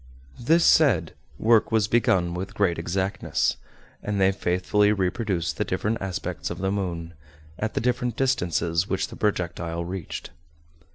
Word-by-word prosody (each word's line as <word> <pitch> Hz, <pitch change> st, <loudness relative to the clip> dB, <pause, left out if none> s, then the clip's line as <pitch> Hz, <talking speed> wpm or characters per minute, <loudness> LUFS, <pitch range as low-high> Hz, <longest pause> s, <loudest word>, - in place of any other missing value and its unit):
This 165 Hz, +8 st, +3 dB
said, 150 Hz, -7 st, +4 dB, 0.2 s
work 115 Hz, 0 st, +3 dB
was 110 Hz, -2 st, +3 dB
begun 95 Hz, -7 st, +2 dB
with 90 Hz, +2 st, -5 dB
great 95 Hz, -5 st, +1 dB
exactness; 95 Hz, +3 st, -1 dB, 0.4 s
and 105 Hz, -1 st, -2 dB
they 95 Hz, 0 st, +4 dB
faithfully 95 Hz, +2 st, +1 dB
reproduced 95 Hz, -2 st, -1 dB
the -, -, +1 dB
different 110 Hz, +2 st, -1 dB
aspects 95 Hz, -2 st, -4 dB
of -, -, -5 dB
the 95 Hz, +1 st, -1 dB
moon, 85 Hz, -4 st, -3 dB, 0.5 s
at 110 Hz, +1 st, -2 dB
the -, -, 0 dB
different 125 Hz, -1 st, 0 dB
distances 90 Hz, -9 st, 0 dB
which 95 Hz, -, -1 dB
the -, -, -9 dB
projectile 85 Hz, -4 st, -2 dB
reached. 90 Hz, -3 st, -6 dB
95 Hz, 145 wpm, -25 LUFS, 90-110 Hz, 0.5 s, said